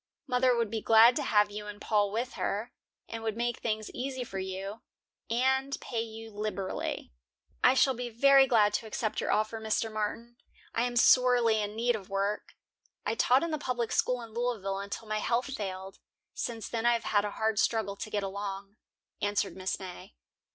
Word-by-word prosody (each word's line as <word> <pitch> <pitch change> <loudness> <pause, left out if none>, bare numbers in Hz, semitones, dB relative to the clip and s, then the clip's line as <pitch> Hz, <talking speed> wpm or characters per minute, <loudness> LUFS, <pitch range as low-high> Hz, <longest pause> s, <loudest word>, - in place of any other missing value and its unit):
Mother 250 -1 +3
would 230 -3 0
be 225 -1 -2
glad 225 +3 +7
to - - 0
have 210 -6 +3
you 210 0 -6
and 205 0 -8
Paul 205 -2 +1
with 240 +4 -2
her, 220 +5 -2 0.4
and 225 0 -6
would 220 -1 -3
make 240 0 -1
things 215 -2 -2
easy 260 0 -4
for 195 -5 -6
you, 190 +3 -5 0.5
and 265 +3 +1
pay 230 -3 -3
you 225 0 -8
liberally." 205 -2 -4 0.5
"I 255 - +6
shall 265 0 +4
be 245 0 -5
very 270 +3 +6
glad 210 -4 +4
to 220 - -2
accept 215 0 -2
your - - -1
offer, 215 +1 0
Mr. 220 0 -1
Martin. 230 +3 -4 0.4
I 235 - +1
am 245 0 -3
sorely 240 -3 +5
in 210 0 -4
need 240 +1 +1
of 195 -4 -8
work. 200 +1 -2 0.5
I 210 - +1
taught 250 +4 +3
in 335 - -2
the 310 - -1
public 245 -4 -2
school 250 -1 +1
in 225 -1 -11
Louisville 220 -5 -2
until 200 +3 -6
my 215 0 -1
health 245 +5 0
failed. 190 -4 -5 0.3
Since 230 -2 -4
then 230 0 -1
I 240 - +5
have 230 - -1
had 205 -1 +2
a 210 - -2
hard 220 -2 +1
struggle 215 -3 +1
to 215 - -6
get 205 -1 -1
along," 200 +1 -5 0.4
answered 205 -1 0
Mrs. 190 0 -3
May. 180 - -9
220 Hz, 195 wpm, -30 LUFS, 205-240 Hz, 0.5 s, glad